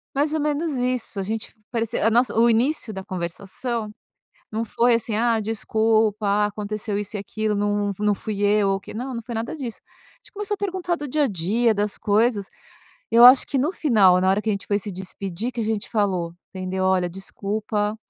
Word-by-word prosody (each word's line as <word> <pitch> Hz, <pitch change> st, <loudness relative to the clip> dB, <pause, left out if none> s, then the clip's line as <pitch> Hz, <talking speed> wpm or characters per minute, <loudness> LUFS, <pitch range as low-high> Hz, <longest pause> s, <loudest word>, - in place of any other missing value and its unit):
Mais 295 Hz, +2 st, +1 dB
ou 315 Hz, -, 0 dB
menos 300 Hz, +1 st, -1 dB
isso. 250 Hz, -4 st, -2 dB
A -, -, 0 dB
gente 220 Hz, +3 st, -3 dB
f -, -, -24 dB
parecia 230 Hz, -2 st, -1 dB
a -, -, +5 dB
nossa, 240 Hz, 0 st, +2 dB
o 235 Hz, +1 st, +6 dB
início 235 Hz, +1 st, +1 dB
da 190 Hz, -1 st, -6 dB
conversação 200 Hz, +5 st, -4 dB, 0.6 s
não 225 Hz, +1 st, -2 dB
foi 235 Hz, +2 st, +3 dB
assim: 225 Hz, -1 st, -1 dB
"Ah, 230 Hz, 0 st, +2 dB
desculpa. 220 Hz, 0 st, +1 dB
Ah, 205 Hz, +1 st, +3 dB
aconteceu 210 Hz, 0 st, -3 dB
isso 205 Hz, +1 st, -4 dB
e -, -, -2 dB
aquilo. 215 Hz, +1 st, -2 dB
Não 205 Hz, 0 st, 0 dB
não 210 Hz, -1 st, +2 dB
fui 205 Hz, +1 st, -5 dB
eu, 205 Hz, -1 st, +3 dB
o 195 Hz, -, -1 dB
que", 195 Hz, -, -11 dB
não, 255 Hz, +3 st, -4 dB
não 235 Hz, -, -4 dB
foi 235 Hz, 0 st, -6 dB
nada 230 Hz, +7 st, -3 dB
disso. 250 Hz, -7 st, -6 dB
A -, -, -28 dB
gente -, -, -19 dB
começou 415 Hz, 0 st, -2 dB
a -, -, -28 dB
perguntar 370 Hz, -3 st, -2 dB
do 295 Hz, -3 st, -6 dB
dia 295 Hz, +3 st, +1 dB
a -, -, +3 dB
dia, 215 Hz, +4 st, +1 dB
das 205 Hz, 0 st, -1 dB
coisas. 210 Hz, -1 st, +1 dB, 0.7 s
Eu 235 Hz, +1 st, +8 dB
acho 255 Hz, +1 st, +9 dB
que 275 Hz, -, -1 dB
no 295 Hz, +7 st, +1 dB
final, 210 Hz, -, +4 dB
na 185 Hz, -, +2 dB
hora 195 Hz, +2 st, +2 dB
que 225 Hz, -, -3 dB
a -, -, +3 dB
gente 200 Hz, -, -4 dB
foi 205 Hz, -, +1 dB
se 205 Hz, +1 st, -5 dB
despedir, 190 Hz, +3 st, -5 dB
que 240 Hz, -, -4 dB
a -, -, -1 dB
gente 220 Hz, 0 st, -2 dB
falou, 185 Hz, -6 st, 0 dB, 0.2 s
entendeu: 185 Hz, 0 st, -3 dB
"Olha, 185 Hz, -1 st, +2 dB
desculpa, 205 Hz, +3 st, -3 dB
215 Hz, 220 wpm, -23 LUFS, 200-240 Hz, 0.7 s, acho